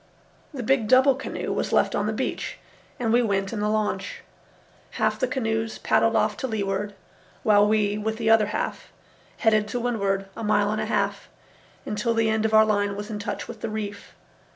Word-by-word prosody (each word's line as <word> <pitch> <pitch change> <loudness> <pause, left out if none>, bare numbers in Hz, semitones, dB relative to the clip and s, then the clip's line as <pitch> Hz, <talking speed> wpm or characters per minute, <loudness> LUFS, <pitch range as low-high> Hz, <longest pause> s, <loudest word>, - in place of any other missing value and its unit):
The 270 -5 -5
big 235 -2 +2
double 260 +3 +6
canoe 270 - -4
was - - -2
left - - +3
on - - 0
the - - 0
beach, - - -3 0.4
and 230 -2 0
we 240 - +5
went 195 -3 -1
in 220 - -3
the 210 0 0
launch. 215 - -2 0.7
Half - - 0
the - - +1
canoes 225 - -2
paddled 225 0 +2
off 215 -1 +2
to 260 - -3
leeward, 205 -2 -2 0.5
while 210 -2 +5
we, 210 -1 +1
with 220 +1 -2
the 225 -1 -3
other 220 -2 +5
half, - - -4 0.5
headed 215 -2 +2
to 245 +3 -3
windward 200 -5 -1
a 225 - -6
mile 210 -1 +2
and 215 - -1
a - - -2
half, - - -1 0.6
until 230 +2 -1
the 225 -1 +2
end 220 0 0
of 220 - 0
our 220 0 +7
line 205 -1 0
was 205 +2 -6
in 210 - -4
touch 205 - -4
with 225 -2 -9
the 225 - -3
reef. 205 -1 -6
215 Hz, 200 wpm, -25 LUFS, 205-230 Hz, 0.7 s, our